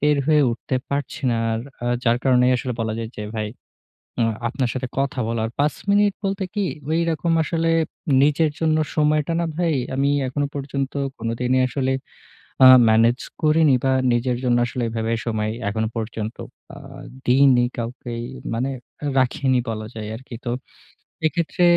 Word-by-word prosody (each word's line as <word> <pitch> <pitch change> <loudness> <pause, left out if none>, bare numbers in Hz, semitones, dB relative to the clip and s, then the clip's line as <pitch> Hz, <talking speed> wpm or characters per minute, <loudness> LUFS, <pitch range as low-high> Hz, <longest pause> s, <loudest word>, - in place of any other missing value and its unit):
বের 150 0 +3
হয়ে 150 -1 +5
উঠতে 125 +2 -2
পারছি 140 -1 -3
না। - - +1 0.2
আর 110 - -1 0.2
আ - - -1 0.2
যার 115 -1 +4
কারণেই 125 -1 +4
আসলে 125 0 -3
বলা 110 -1 -1
যায় 115 -1 -5
যে 105 - -4
ভাই 105 -1 -2 0.7
আ - - +4 0.2
আপনার 125 +1 -1
সাথে 130 0 -3
কথা 140 -1 -1
বলার। 115 -1 -1
৫ 150 +1 +2 0.2
মিনিট 205 0 +4
বলতে 195 0 -1
কি 205 -1 0 0.3
ওই 160 +1 +2
রকম 165 +2 -1
আসলে 165 +1 0 0.5
নিজের 150 +2 +3
জন্য 155 -1 +2 0.2
সময়টা 150 +1 +2
না 170 - 0
ভাই 170 -2 +1 0.2
আমি 140 +1 +2 0.2
এখনো 145 +2 -1
পর্যন্ত 140 -1 -3 0.3
কোনদিনই 125 +3 0
আসলে 130 0 -1 0.7
আ - - +11 0.2
ম্যানেজ 115 +3 +4 0.2
করিনি 155 -2 +4
বা 135 - +3 0.2
নিজের 120 +1 +1
জন্য 120 -1 +3
আসলে 120 +1 -4
এভাবে 115 0 -2
সময় 110 -2 -1 0.2
এখনো 110 +2 -1
পর্যন্ত 110 0 -4 0.4
আ - - -12 0.5
দিইনি 130 -1 +5
কাউকেই, 120 0 -5 0.3
মানে 125 +4 -1 0.5
রাখিনি 130 0 +2
বলা 110 -1 -4
যায় 110 -1 -6
আরকি। 130 0 -11
তো 120 - -2 0.8
এক্ষেত্রে 170 +2 0
130 Hz, 155 wpm, -22 LUFS, 115-150 Hz, 0.8 s, আ